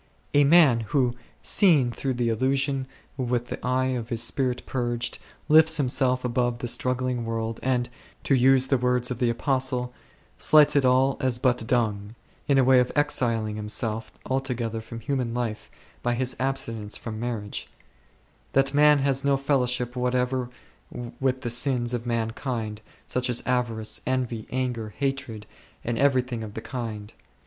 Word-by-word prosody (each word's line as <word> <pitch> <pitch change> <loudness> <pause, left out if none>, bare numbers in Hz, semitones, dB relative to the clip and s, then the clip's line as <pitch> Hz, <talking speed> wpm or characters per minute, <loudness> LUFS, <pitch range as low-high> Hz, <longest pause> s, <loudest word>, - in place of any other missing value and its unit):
A 145 0 +5
man 145 -6 +6
who, 120 +2 0 0.3
seeing 150 -11 +4
through 130 +1 -3
the 120 -1 0
illusion 135 +3 0 0.3
with 125 -2 -1
the - - -6
eye 130 +1 +1
of 120 -3 -3
his 115 -1 0
spirit 125 0 -1
purged, 120 -2 -2 0.3
lifts 160 +1 +6
himself 130 -2 +1
above 120 0 0
the 120 - -4
struggling 125 0 0
world, 115 0 -3
and, 125 -2 0 0.4
to - - +1
use 130 0 +5
the 135 -1 +1
words 125 0 0
of 125 - -4
the 120 - +2
Apostle, 125 0 -1 0.5
slights 150 -2 +5
it 140 -2 +4
all 130 +1 +3
as 130 -2 0
but 125 -2 0
dung, 110 -3 -1 0.3
in 140 -2 +3
a 130 - +4
wayexiling 125 -4 +2
himself 110 +1 -3
altogether 125 -4 -2
from 115 +1 -9
human 130 -4 -2
life 115 -3 -3 0.3
by 120 0 0
his 130 +1 -1
abstinence 115 -5 -2
from 110 -2 -6
mar 120 -1 -2
riage,— 105 0 -7 0.9
that 135 +1 +2
man 150 +1 +6
has 135 0 0
no 140 -1 +3
fellowship 125 -3 0
whatever 125 0 0 0.7
with 130 -1 0
the 120 - -3
sins 125 -1 0
of 120 0 -3
mankind, 115 -1 -3 0.2
such 125 0 -1
as 120 - 0
avarice, 115 -3 -1
envy, 125 -4 -2
anger, 125 -4 -2
hatred, 135 -6 -3 0.4
and 115 -1 -2
everything 130 -4 +1
of 105 -1 -9
the 110 - -5
kind. 110 -5 -6
125 Hz, 155 wpm, -25 LUFS, 115-130 Hz, 0.9 s, man